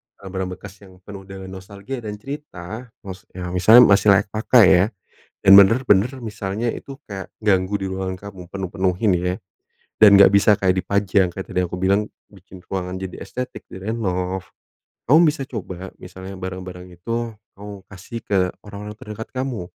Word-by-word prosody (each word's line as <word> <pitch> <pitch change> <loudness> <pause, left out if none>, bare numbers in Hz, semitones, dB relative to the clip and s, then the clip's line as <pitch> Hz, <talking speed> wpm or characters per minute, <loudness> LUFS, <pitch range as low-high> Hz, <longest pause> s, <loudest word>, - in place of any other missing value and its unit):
barang-barang 95 -1 -5
bekas 100 +1 -12
yang 95 -1 -16
penuh 100 -1 -10
dengan 95 -1 -9
nostalgia 100 +6 -8
dan 105 -2 -6
cerita, 115 -3 -8 0.2
maksudnya 90 -1 -8
misalnya 110 +7 +7
masih 100 -1 +4
layak 100 - 0
pakai 110 +1 +5
ya, 95 - +4 0.6
dan 95 - +5
benar-benar, 105 +2 +5
misalnya 105 0 -3
itu 135 +4 -7
kayak 95 -1 -7
ganggu 95 -2 +1
di 95 - -3
ruangan 95 0 -3 0.2
kamu 95 -2 -12
penuh-penuhin, 95 +1 0
ya. 90 +1 -1 0.7
Dan, 105 -2 +9
enggak - - +9
bisa 100 +1 +5
kayak 95 -1 +2
dipajang 100 -1 +1
kayak 95 +2 -7
tadi 90 - -1
aku 90 - -5
bilang 100 +3 +2 0.2
bikin 95 -1 -15
ruangan 90 -1 -4
jadi 95 -1 -6
estetik 125 0 -7
direnov. 95 -2 -3 0.7
Kamu 165 +4 +7
bisa 150 -2 0
coba, 95 -8 -7
misalnya 95 +1 -10
barang-barang 90 -1 -7
itu 115 +5 -4 0.2
kamu 100 -1 -9
kasih 95 +4 -8
ke 100 - -1 0.3
orang-orang 105 +1 -8
terdekat 105 +1 -8
kamu, 130 -8 -3
95 Hz, 155 wpm, -21 LUFS, 95-110 Hz, 0.7 s, Dan